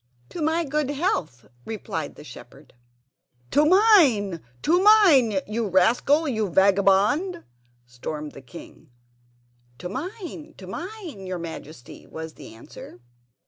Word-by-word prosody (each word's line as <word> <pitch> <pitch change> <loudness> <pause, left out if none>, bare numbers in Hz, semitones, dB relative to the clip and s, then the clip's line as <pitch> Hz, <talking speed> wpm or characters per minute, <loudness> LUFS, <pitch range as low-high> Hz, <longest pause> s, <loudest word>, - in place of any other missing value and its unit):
"To 340 - -7
my 320 +2 +1
good 300 -1 -2
health!" 225 - -2 0.2
replied 220 - -5
the - - -13
shepherd. - - -14 0.8
"To 295 - +4
mine—to 300 - +3
mine, 305 - +5
you 220 +1 -3
rascal, 240 - +2
you 220 -6 -1
vagabond!" 200 - +2 0.4
stormed 150 +5 -7
the 140 - -12
king. 160 +2 -14 0.9
"To 180 - -7
mine, 320 - -7
to 190 - -11
mine, 330 - -8
your 185 -1 -4
Majesty," 160 -6 -10
was 160 0 -8
the 110 - -13
answer. 115 +1 -13
220 Hz, 115 wpm, -24 LUFS, -, 0.9 s, mine